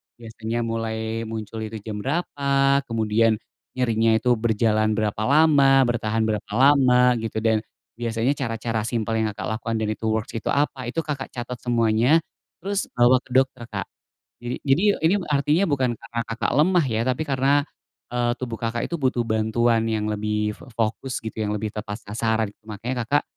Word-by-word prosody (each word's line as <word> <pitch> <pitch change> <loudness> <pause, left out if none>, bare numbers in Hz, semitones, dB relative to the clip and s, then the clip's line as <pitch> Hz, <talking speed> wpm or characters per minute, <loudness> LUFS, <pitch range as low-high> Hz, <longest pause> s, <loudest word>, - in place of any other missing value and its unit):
Biasanya 115 0 -5
mulai 115 0 -3
muncul 110 0 -6
itu 110 +1 -7
jam 105 -2 -5
berapa, 140 -1 +1
kemudian 110 0 +2 0.4
nyerinya 115 -3 +2
itu 125 +2 +2
berjalan 110 -1 +2
berapa 110 -1 -1
lama, 140 -2 +5
bertahan 115 -2 0
berapa 105 -2 -2
lama 125 -2 +5
gitu, 110 -1 -3
dan 110 -1 +3 0.4
biasanya 115 +2 0
cara-cara 115 -3 -2
simpel 115 -1 -1
yang, 110 - +1
Kakak, 110 +2 -3
lakukan 115 0 -4
dan 105 - -1
itu 110 - -5
works 110 0 -1
itu - - -6
apa, 140 -3 0
itu, 165 +7 -1
Kakak, 140 -3 -4
catat 125 0 -5
semuanya, 120 +6 +3 0.4
terus 200 +1 -1
bawa 120 +1 +5
ke 125 - -19
dokter, 130 -2 +2
Kak. 100 -3 -4 0.6
Jadi 120 +1 -4
jadi 140 +8 +3 0.2
ini 175 - +4 0.2
artinya 150 +6 +2
bukan 130 -4 +1
karena, 115 +1 -6
Kakak, 115 +2 -2
lemah 170 0 +4
ya, 110 -1 0
tapi 130 +5 0
karena, 140 0 +2 0.5
eee, 120 -1 +1
tubuh, 120 -3 -5
Kakak, 115 0 -2
itu 170 - -3
butuh 125 -3 +1
bantuan 115 +1 +1
yang 110 -1 -1
lebih 105 0 -1
f - - -15
fokus 115 +3 -2
gitu 110 0 -6
yang 105 0 -1
lebih 105 0 -3
tepat 105 0 -6
sasaran 110 0 -1 0.2
makanya, 115 +4 -3
Kakak, 145 +3 +2
115 Hz, 165 wpm, -23 LUFS, 110-130 Hz, 0.6 s, lama